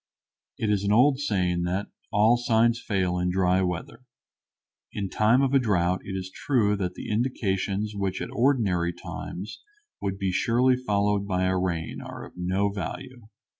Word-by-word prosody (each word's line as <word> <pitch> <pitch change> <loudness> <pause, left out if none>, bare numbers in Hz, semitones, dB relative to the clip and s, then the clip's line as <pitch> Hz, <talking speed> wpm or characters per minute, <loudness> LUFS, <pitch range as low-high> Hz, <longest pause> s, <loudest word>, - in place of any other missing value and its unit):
It 105 - 0
is 100 -1 +1
an 100 - +1
old 130 +5 +5
saying 90 -10 0
that 95 +3 -2 0.2
"all 110 +3 +5
signs 120 0 +2
fail 90 -3 0
in 90 0 0
dry 90 0 +2
weather." 90 +7 -4 0.9
In 100 -2 -4
time 115 +5 +3
of 135 0 +1
a 135 - +6
drought 90 -6 +1
it 95 - -5
is 95 0 -5
true 110 -7 +1
that 90 -2 -3
the - - -6
indications 105 -3 -1
which 95 -2 -2
at - - -5
ordinary 105 -10 +1
times 90 +3 -7 0.4
would 95 -1 -2
be 95 -1 -1
surely 125 +6 +3
followed 105 -4 0
by 95 -2 0
a 95 0 +1
rain 85 -3 -2
are - - -8
of - - -14
no 95 +3 0
value. 105 +5 -7
100 Hz, 170 wpm, -26 LUFS, 95-115 Hz, 0.9 s, a